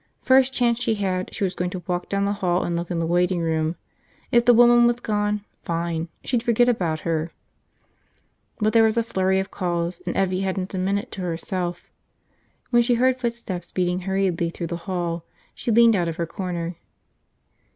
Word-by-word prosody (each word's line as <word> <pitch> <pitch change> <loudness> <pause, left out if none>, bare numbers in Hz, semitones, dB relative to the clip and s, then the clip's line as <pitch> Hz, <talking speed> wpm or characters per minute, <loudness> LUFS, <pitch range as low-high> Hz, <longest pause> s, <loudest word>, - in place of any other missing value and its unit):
First 265 0 +4
chance 240 -2 +1
she 225 -2 +1
had, 185 -3 -2
she 205 - -4
was 190 -1 0
going 180 0 -2
to 180 -1 -6
walk 175 -1 -3
down 200 0 0
the 200 - 0
hall 180 -3 0
and 170 - -2
look 170 0 -3
in 175 - -2
the 165 - 0
waiting 175 +1 +1
room. 160 0 0 0.6
If 235 0 +4
the 245 - +7
woman 240 0 +6
was 240 0 +1
gone, 210 -2 -1 0.2
fine, 170 -1 -2 0.2
she'd 245 -2 0
forget 240 +1 +3
about 175 -10 0
her. 165 0 -1 1.3
But 215 0 +1
there 230 - +6
was 220 +1 +2
a 230 - +3
flurry 190 -4 +1
of 190 +1 -4
calls 175 -2 -2
and - - -2
Evvie 185 -1 +1
hadn't 190 0 -2
a 190 - -2
minute 200 +5 -1
to 195 - -6
herself. 175 0 -3 0.9
When 240 -1 +5
she 240 +1 +2
heard 255 +2 +2
footsteps 230 -8 -4
beating 180 0 0
hurriedly 185 -3 0
through 170 0 -5
the - - -2
hall, 175 -3 -2 0.3
she - - -5
leaned 230 0 +6
out 175 -3 +1
of 165 - -3
her 170 - -2
corner. 175 -1 -4
185 Hz, 195 wpm, -23 LUFS, 175-225 Hz, 1.3 s, the